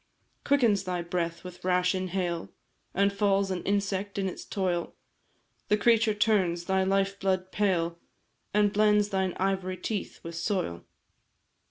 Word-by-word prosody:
"Quickens 235 -9 +3
thy 180 -1 -2
breath 170 -1 -3
with 180 -1 -10
rash 180 0 +2
inhale, 185 -2 -2 0.5
And 200 +1 +3
falls 200 -1 +2
an 180 -2 -2
insect 200 0 -1
in 195 -1 0
its 185 - -6
toil? 180 -3 -2 0.7
The 210 - +3
creature 225 0 +3
turns 195 -5 +2
thy 190 0 +2
life 195 +1 +1
blood 185 -1 0
pale, 170 -5 0 0.5
And 205 0 +3
blends 210 0 +4
thine 190 -2 0
ivory 190 -1 -1
teeth 210 0 -4
with 165 - -7
soil. 165 - -2
190 Hz, 140 wpm, -28 LUFS, 180-205 Hz, 0.7 s, blends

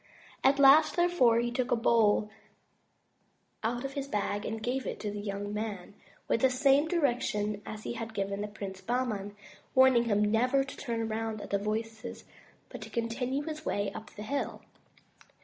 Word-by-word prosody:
At 275 +1 +5
last, 285 +3 +7
therefore, 345 -10 +4
he 240 0 0
took 250 0 -1
a - - +3
bowl 220 -2 +3 1.3
out 240 +3 -2
of 275 - -4
his 280 0 -4
bag 205 -3 -2
and 220 0 -3
gave 250 +4 -2
it - - -4
to 210 - -3
the 205 - -5
young 205 0 -4
man, 210 -3 -4 0.3
with 230 - +1
the 265 - +5
same 275 +3 +3
directions 240 - 0
as 215 0 -7
he - - -3
had 225 -1 -6
given 200 +1 -2
Prince 195 -3 -7
Bahman, 220 -5 -2 0.4
warning 260 -2 +6
him 210 -2 +2
never 250 +5 +3
to 270 - -9
turn 235 -4 -3
around 220 0 -2
at - - -9
the 200 - +2
voices 220 +2 -4 0.5
but - - -9
to - - -8
continue 250 +4 -2
his 310 0 -6
way 200 -7 -1
up 220 - -8
the 210 - -7
hill. 280 +6 -3
230 Hz, 175 wpm, -30 LUFS, 210-260 Hz, 1.3 s, last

